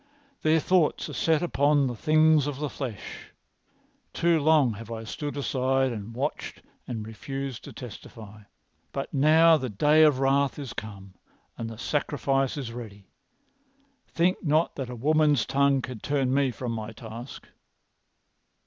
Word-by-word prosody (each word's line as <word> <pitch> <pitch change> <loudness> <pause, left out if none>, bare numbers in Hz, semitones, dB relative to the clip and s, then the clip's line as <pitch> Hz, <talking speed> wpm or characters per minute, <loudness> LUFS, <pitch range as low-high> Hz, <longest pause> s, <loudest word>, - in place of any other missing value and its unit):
Their 155 +1 +3
thoughts 175 -1 +1
are - - -7
set 160 0 +1
upon 145 -3 +2
the 125 - -2
things 155 +2 +3
of 145 -2 -4
the 150 -1 -3
flesh. 125 -8 -7 0.8
Too 170 -1 +2
long 150 -5 +4
have 115 +2 -10
I 115 -1 -5
stood 145 +6 -5
aside 135 -1 0
and 110 0 -7
watched 140 +5 -4 0.2
and 110 -3 -5
refused 135 +3 -6
to - - -9
testify. 110 -3 -11 0.5
But 135 - -4
now 160 +3 +5
the 130 -3 -4
day 150 +9 +3
of 150 -4 +5
wrath 135 +1 +1
is 140 -5 -6
come 100 -3 -9 0.4
and 115 -1 -5
the 115 - -9
sacrifice 135 +1 -1
is 125 -5 -5
ready. 105 -5 -10 1.0
Think 175 +2 0
not 155 +1 +1
that 135 -3 -5
a 125 - -6
woman's 150 +1 +2
tongue 140 -1 +2
can 125 -3 -6
turn 135 -1 0
me 140 -1 +2
from 125 0 -5
my 110 -1 -5
task." 115 +3 -9
135 Hz, 150 wpm, -26 LUFS, 115-150 Hz, 1.0 s, now